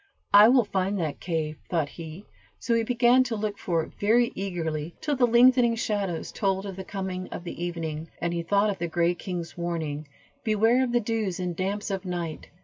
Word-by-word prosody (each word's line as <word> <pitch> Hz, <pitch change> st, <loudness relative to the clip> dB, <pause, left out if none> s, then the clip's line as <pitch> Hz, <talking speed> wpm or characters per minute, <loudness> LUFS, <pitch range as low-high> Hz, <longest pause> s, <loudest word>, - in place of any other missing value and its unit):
"I 205 Hz, +1 st, +10 dB
will 250 Hz, -2 st, +5 dB
find 195 Hz, 0 st, -1 dB
that 160 Hz, -5 st, -2 dB
cave," 160 Hz, -3 st, -2 dB
thought 160 Hz, -5 st, 0 dB
he; 165 Hz, +4 st, -9 dB, 0.3 s
so 235 Hz, -, -1 dB
he 230 Hz, -, +3 dB
began 245 Hz, +2 st, +4 dB
to 230 Hz, -2 st, -2 dB
look 210 Hz, -1 st, -3 dB
for 165 Hz, -3 st, 0 dB
it -, -, -11 dB
very 235 Hz, +4 st, +3 dB
eagerly, 165 Hz, -4 st, -3 dB
till 295 Hz, -2 st, -1 dB
the 250 Hz, -2 st, +3 dB
lengthening 240 Hz, 0 st, +5 dB
shadows 200 Hz, -6 st, -2 dB
told 195 Hz, -1 st, -1 dB
of 195 Hz, -2 st, -6 dB
the 190 Hz, -, -6 dB
coming 190 Hz, -1 st, -4 dB
of 175 Hz, -, -7 dB
evening, 165 Hz, -2 st, -4 dB
and 170 Hz, 0 st, -1 dB
he 170 Hz, -, -1 dB
thought 200 Hz, +5 st, +2 dB
of 195 Hz, -, -6 dB
the 170 Hz, -, -1 dB
gray 170 Hz, +1 st, +1 dB
king's 175 Hz, -1 st, -6 dB
warning, 160 Hz, -4 st, -3 dB, 0.4 s
"Beware 225 Hz, +4 st, +3 dB
of 250 Hz, -, -1 dB
the 240 Hz, -, +3 dB
dews 215 Hz, -5 st, -2 dB
and 180 Hz, -2 st, -2 dB
damps 200 Hz, +3 st, -2 dB
of 195 Hz, -1 st, -2 dB
night." 175 Hz, -4 st, -5 dB
190 Hz, 200 wpm, -26 LUFS, 170-220 Hz, 0.4 s, I